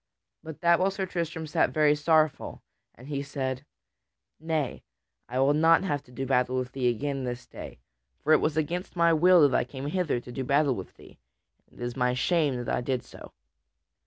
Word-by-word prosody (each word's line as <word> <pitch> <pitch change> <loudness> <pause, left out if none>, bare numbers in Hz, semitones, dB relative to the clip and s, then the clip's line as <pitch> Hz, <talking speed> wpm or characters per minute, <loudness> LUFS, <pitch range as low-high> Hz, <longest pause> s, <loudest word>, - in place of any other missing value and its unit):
But 160 -2 -10
that 170 0 +4
while 190 - +2
Sir 195 0 -3
Tristram 170 -3 -4
sat 150 - +1
very 150 -1 +3
sorrowful, 155 0 +1 0.3
and 125 - -14
he 140 -2 -3
said: 135 -2 -4 0.8
"Nay, 155 -4 -2 0.5
I 125 - -4
will 135 +2 +3
not 165 +3 +4
have 145 -7 -1
to 125 - -19
do 135 +2 -4
with 125 -1 0
thee 125 -2 0
again 135 +3 -2
this 125 0 -5
day, - - -10 0.5
for 155 - +4
it - - +5
was 155 0 0
against 170 +5 -2
my 170 -1 +4
will 170 -1 +6
that 130 - -1
I - - +3
came 130 +2 -8
hither 160 -4 -1
to 125 - -11
do 130 +2 -4
battle 140 +1 +2
with 95 -5 -8
thee, - - -17 0.5
and - - -21
it - - -5
is 120 0 -3
to 135 - -9
my 125 0 +1
shame 150 0 +1
that 120 -1 -2
I - - -2
did 130 0 -2
so. - - -13
145 Hz, 205 wpm, -27 LUFS, 130-160 Hz, 0.8 s, will